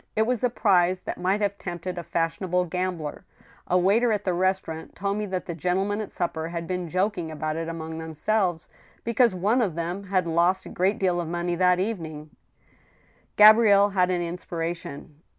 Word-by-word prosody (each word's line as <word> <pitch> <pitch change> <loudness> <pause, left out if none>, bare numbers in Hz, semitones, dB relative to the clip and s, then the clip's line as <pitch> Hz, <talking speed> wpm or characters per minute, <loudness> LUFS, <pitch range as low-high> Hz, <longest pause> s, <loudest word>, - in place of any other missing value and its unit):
It 220 - +3
was 245 0 -1
a 250 - +3
prize 185 -5 +2
that - - -6
might 190 +4 +1
have 200 -1 -1
tempted 175 0 -5
a 175 - -4
fashionable 175 +2 -1
gambler.... 180 -3 -3 0.4
A 180 - +3
waiter 210 +6 +3
at 210 -1 0
the 185 - 0
restaurant 180 -3 -2
told 200 +2 -2
me 210 0 -2
that 185 -1 -3
the 170 - -4
gentlemen 190 +5 -1
at 210 - -7
supper 165 -2 -3
had 170 0 -5
been 180 -1 -3
jok 190 +4 0
ing 165 -2 -4
about 155 0 -3
it 165 0 -3
among 160 -1 -6
themselves, 165 +2 -1 0.4
because 235 -2 +2
one 210 +8 +2
of 190 -9 -1
them 175 +4 -4
had 185 -2 0
lost 175 +3 +2
a - - -8
great 190 +3 0
deal 180 -2 +1
of 170 - -5
money 175 +1 -2
that 180 +1 +3
evening 160 -7 -4 0.3
— - - -34
" - - -36
Gabrielle 210 -1 +7
had 185 -2 +2
an 180 -1 0
inspiration. 170 -3 -6
180 Hz, 195 wpm, -25 LUFS, 170-200 Hz, 0.4 s, Gabrielle